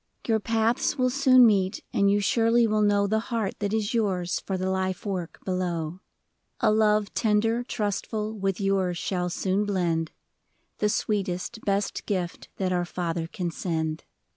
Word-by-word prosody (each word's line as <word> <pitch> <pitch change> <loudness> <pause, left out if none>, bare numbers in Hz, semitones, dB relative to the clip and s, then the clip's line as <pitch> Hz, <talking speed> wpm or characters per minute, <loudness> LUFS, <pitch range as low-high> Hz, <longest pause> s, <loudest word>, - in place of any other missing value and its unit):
Your 220 -2 +3
paths 225 +6 +1
will 255 -1 +2
soon 260 -2 +6
meet, 195 -4 +2
and 200 0 +3
you 205 +1 +3
surely 230 +3 +3
will 215 -1 +1
know 205 -1 +3
The 220 +2 +1
heart 225 -5 -2
that 205 -1 -1
is 220 0 -1
yours 190 -6 0
for 190 - -3
the 185 0 -2
life 190 0 -2
work 185 -4 -4
below; 175 -2 -2 0.6
A 220 -3 +3
love 210 -1 +2
tender, 225 +2 +1
trustful, 215 -1 -2
with 195 -2 -2
yours 195 -3 +1
shall 180 -1 -2
soon 190 +3 0
blend, 170 -5 0 0.3
— - - -46
The 210 - +2
sweetest, 205 +1 -2
best 200 0 -1
gift 180 -4 -3
that 185 -1 0
our 175 0 +1
Father 170 -2 -3
can 175 0 -4
send. 160 -2 -2
200 Hz, 165 wpm, -26 LUFS, 180-220 Hz, 0.6 s, soon